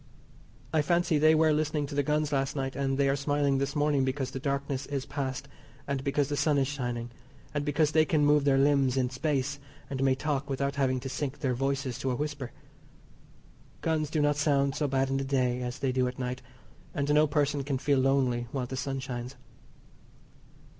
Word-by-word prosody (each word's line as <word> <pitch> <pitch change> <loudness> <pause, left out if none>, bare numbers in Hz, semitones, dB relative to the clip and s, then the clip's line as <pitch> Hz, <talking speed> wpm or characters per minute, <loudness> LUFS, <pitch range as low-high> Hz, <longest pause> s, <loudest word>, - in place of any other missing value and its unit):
I 155 - +4
fancy 170 0 +2
they 155 +1 +6
were 155 0 +4
listening 150 -1 0
to 145 - -8
the 145 - +2
guns 150 +1 0
last 135 -1 0
night, 135 -2 -3
and 135 -1 0
they 140 -1 +3
are 135 - +2
smiling 140 -1 +1
this 140 +2 -2
morning 145 -2 +2
because 130 0 -2
the 135 - -5
darkness 140 0 -2
is 140 -2 -3
past, 135 -1 -4 0.4
and 140 -2 -2
because 140 0 +1
the 145 - -2
sun 150 0 +2
is 135 -1 +2
shining, 120 -4 -4 0.4
and 145 -1 -1
because 150 +1 +1
they 155 0 +5
can 155 -2 +2
move 150 0 +4
their 140 -1 +3
limbs 135 -2 +3
in 125 -1 +1
space, 140 0 -1 0.3
and 135 -1 -2
may 135 -1 +3
talk 145 0 -2
without 140 0 -1
having 130 -2 +1
to 135 - -5
sink 135 0 -3
their 130 -3 +1
voices 135 0 -2
to 135 - -1
a 125 - 0
whisper. 145 -3 -4 1.3
Guns 155 -2 0
do 155 -1 0
not 145 0 +2
sound 140 -2 +2
so 150 - -1
bad 135 0 0
in 135 - +1
the 135 - -1
day 130 -2 0
as 125 0 -4
they 135 -2 0
do 125 0 +1
at 125 - -5
night, 125 0 -3 0.5
and 140 +1 +1
no 150 +1 +5
person 145 -1 0
can 135 -1 -1
feel 140 +1 +2
lonely 130 -3 +2
while 130 -3 -2
the 130 - -6
sun 135 +1 -2
shines. 125 0 -5
140 Hz, 210 wpm, -29 LUFS, 130-145 Hz, 1.3 s, they